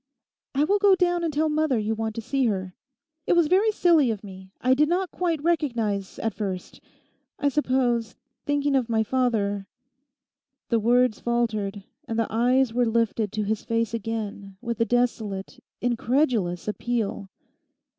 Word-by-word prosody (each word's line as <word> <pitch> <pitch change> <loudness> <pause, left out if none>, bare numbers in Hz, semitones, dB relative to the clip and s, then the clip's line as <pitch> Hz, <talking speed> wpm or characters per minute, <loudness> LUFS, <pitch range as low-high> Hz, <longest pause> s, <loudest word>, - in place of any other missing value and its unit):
'I 280 - +3
will 405 +7 +2
go 400 -1 +6
down 350 -1 +1
and 330 - 0
tell 305 +2 +1
mother 305 -4 +1
you 215 0 0
want 220 0 -3
to 230 - -3
see 270 +3 0
her. 190 -3 -2 0.5
It - - +4
was 345 -2 +4
very 385 +7 +3
silly 335 - +4
of 215 -2 -3
me. 190 -1 -11
I 255 +1 +3
did 300 +3 +3
not 365 +1 0
quite 335 -5 -1
recognise 235 - -1
at 225 - -2
first...I 200 +7 -6
suppose, 250 -5 0 0.3
thinking 290 -1 +1
of 250 -3 +1
my 220 -1 +2
father—' 210 -5 0 1.0
The 230 - +2
words 245 +1 +3
faltered, 215 -4 -1 0.2
and 225 -2 -3
the 230 - +2
eyes 245 +1 +3
were 245 0 +2
lifted 225 -2 0
to 215 -1 -1
his 215 +1 -2
face 230 -1 -1
again 210 -3 -4
with 235 -2 -4
a - - +4
desolate, 225 -5 -1 0.2
incredulous 235 - 0
appeal. 210 -3 -2
235 Hz, 155 wpm, -25 LUFS, 215-285 Hz, 1.0 s, go